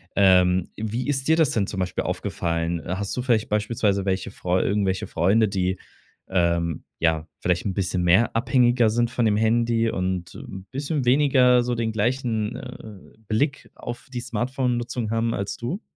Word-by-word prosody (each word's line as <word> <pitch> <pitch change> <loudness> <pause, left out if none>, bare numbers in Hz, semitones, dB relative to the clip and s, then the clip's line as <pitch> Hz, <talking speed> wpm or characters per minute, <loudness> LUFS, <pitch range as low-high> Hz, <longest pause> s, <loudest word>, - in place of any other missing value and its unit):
Ähm, 90 -2 +4
wie 110 +5 -3
ist 135 0 -1
dir 160 - +5
das 160 -4 +3
denn 105 -3 0
zum 95 - -5
Beispiel 90 -1 -2
aufgefallen? 85 0 -2
Hast 100 +3 -3
du - - 0
vielleicht 115 -4 +1
beispielsweise 105 -2 0
welche 95 -1 -1
Freu 90 +1 0
irgendwelche 100 -2 0
Freunde, 100 +6 +2
die, 95 -1 -1 0.5
ähm 85 -3 0 0.2
ja, 80 -1 +1
vielleicht 90 +1 0
'n 95 - -1
bisschen 90 -2 -1
mehr 95 +8 +3
abhängiger 120 -1 +3
sind 120 +1 +1
von 120 -1 0
dem 105 -2 +3
Handy 115 +1 +2
und 90 -2 -3
'n 95 0 -9
bisschen 145 +1 -2
weniger 125 -2 +4
so 120 0 -1
den 115 -1 -1
gleichen, 110 0 -1
äh, 110 -6 -11
Blick 135 +6 -1
auf 120 0 -7
die 125 - -2
Smartphone-Nutzung 120 -1 -2
haben 115 0 0
als 100 0 -3
du? 140 - -4
110 Hz, 165 wpm, -24 LUFS, 95-120 Hz, 0.5 s, dir